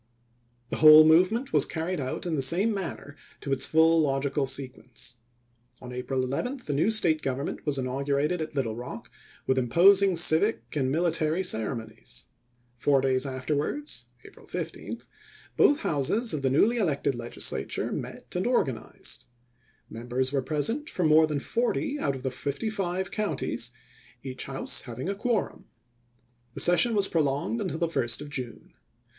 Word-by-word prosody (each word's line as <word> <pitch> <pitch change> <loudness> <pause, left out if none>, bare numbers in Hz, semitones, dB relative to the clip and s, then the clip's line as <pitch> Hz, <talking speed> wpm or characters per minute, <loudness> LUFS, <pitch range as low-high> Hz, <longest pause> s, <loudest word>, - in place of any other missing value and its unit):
The - - -2
whole 155 0 +9
movement 185 +11 +3
was 150 - +5
carried 165 +2 -3
out 130 +7 -4
in 175 - -2
the 140 - 0
same 185 - +4
manner 170 -6 -6 0.3
to 140 - -5
its 130 - +1
full 160 +1 +4
logical 135 -1 0
sequence. 125 -2 -6 0.6
On 125 -1 -9
April 130 +1 -2
11 245 - -3
the 145 - -2
new 150 +9 +2
State 170 -8 +3
government 135 +3 -4
was 145 -2 +1
inaugurated 140 +5 -1
at 155 -1 -6
Little 115 -6 -1
Rock 120 +1 -8 0.3
with 130 0 +2
imposing 190 +9 +5
civic 170 +5 +2
and 135 -3 0
military 165 +2 0
cere 110 - 0
monies. 110 - -10 0.5
Four 140 0 +3
days 130 0 +1
afterwards 145 - -3 0.2
(April - - -15
15) - - -6 0.5
both 290 +2 +4
Houses 205 - 0
of 150 - -2
the 135 - +1
newly 210 - +3
elected 145 -9 0
Legislature 120 -1 -2
met - - -7
and - - 0
organized. - - -2 0.6
Members 125 +3 -3
were 135 - +1
present 160 - -2
from 175 -4 0
more 155 +1 +6
than 150 -2 -2
forty 245 - -1
out 140 -2 -1
of 130 - -9
the 130 - -2
fifty 140 - -3
five 190 -2 -3
counties, 150 - -2 0.5
each 130 -1 -5
House 135 0 -2
hav 120 -3 -9
ing 130 +9 -4
a - - 0
quorum. 225 +3 -2 0.9
The - - -5
session 220 +6 +4
was 200 -1 +4
prolonged 150 +8 -1
until 185 -5 -3
the 170 - +1
1st 120 -6 -1
of 150 0 -8
June. 125 -4 -6
150 Hz, 160 wpm, -27 LUFS, 130-180 Hz, 0.9 s, whole